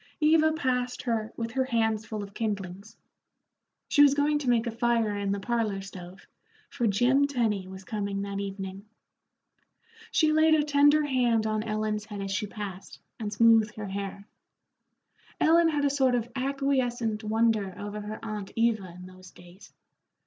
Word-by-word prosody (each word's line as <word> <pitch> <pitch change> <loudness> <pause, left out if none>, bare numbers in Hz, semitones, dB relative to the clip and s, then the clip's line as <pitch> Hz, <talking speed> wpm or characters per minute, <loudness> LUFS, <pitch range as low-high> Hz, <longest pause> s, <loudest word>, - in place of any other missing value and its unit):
Eva 315 0 +4
passed 250 -5 -1
her 225 -3 -2
with 230 -1 -3
her 260 +2 0
hands 225 -3 0
full 215 -2 -4
of 200 0 -10
kindlings. 205 -1 -5 0.9
She 290 - +4
was 285 -1 +6
going 295 +1 +2
to 270 -4 -2
make 235 -1 +2
a 235 - -2
fire 230 -2 +1
in 200 -1 -2
the 200 - -1
parlor 220 -2 -1
stove, 185 -1 -11 0.5
for 240 - 0
Jim 245 +7 +3
Tenny 220 -8 -1
was 190 0 -10
coming 200 -1 -3
that 200 0 -4
evening. 195 0 -6 1.3
She 310 -2 +3
laid 315 0 +5
a 300 - +2
tender 290 +1 +4
hand 245 -5 +1
on 215 0 0
Ellen's 215 -1 -2
head 210 -2 -8
as 195 0 -4
she 210 +2 -1
passed, 200 -2 -8 0.2
and 210 -2 -4
smoothed 225 0 +4
her 210 -2 -6
hair. 200 +1 -6 1.1
Ellen 330 +1 +5
had 295 -2 0
a - - +3
sort 265 -3 +2
of 240 0 -2
acquiescent 255 -5 -1
wonder 215 -3 +1
over 205 +1 -6
her 210 +1 -6
aunt 210 -3 -5
Eva 220 -6 0
in 180 - -10
those 185 0 -14
days. 175 +2 -16
220 Hz, 165 wpm, -27 LUFS, 200-255 Hz, 1.3 s, was